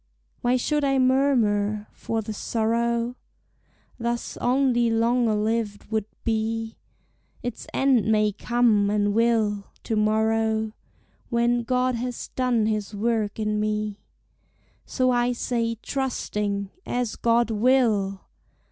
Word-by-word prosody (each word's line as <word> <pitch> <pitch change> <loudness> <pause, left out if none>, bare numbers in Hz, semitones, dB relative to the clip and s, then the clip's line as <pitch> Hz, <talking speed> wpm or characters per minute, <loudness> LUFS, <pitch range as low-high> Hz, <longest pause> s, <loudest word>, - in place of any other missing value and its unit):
Why 245 +1 +2
should 295 +4 0
I 270 -1 +2
murmur? 230 -6 +2
for 225 -1 -3
the 215 - -5
sorrow 235 +3 -1 0.8
Thus 235 0 -2
only 245 -2 +2
longer 230 0 +2
lived 215 0 -2
would 220 -2 -1 0.2
be; 225 0 -2 0.6
Its 245 -2 -5
end 250 -6 +2
may 215 -1 +3
come, 220 -2 +2
and 205 0 +1
will, 220 -3 +2 0.2
to 225 - -2
morrow, 220 0 +1 0.6
When 240 0 +2
God 255 +1 +1
has 245 +1 -4
done 250 -4 +1
his 215 -1 -2
work 215 -1 0
in 210 -1 -1
me; 210 -1 -2 0.9
So 255 -1 +1
I 245 0 +2
say, 230 -1 -1
trusting, 210 -7 -2
As 245 -3 -2
God 235 0 +2
will! 215 -4 +2
225 Hz, 115 wpm, -25 LUFS, 215-245 Hz, 0.9 s, may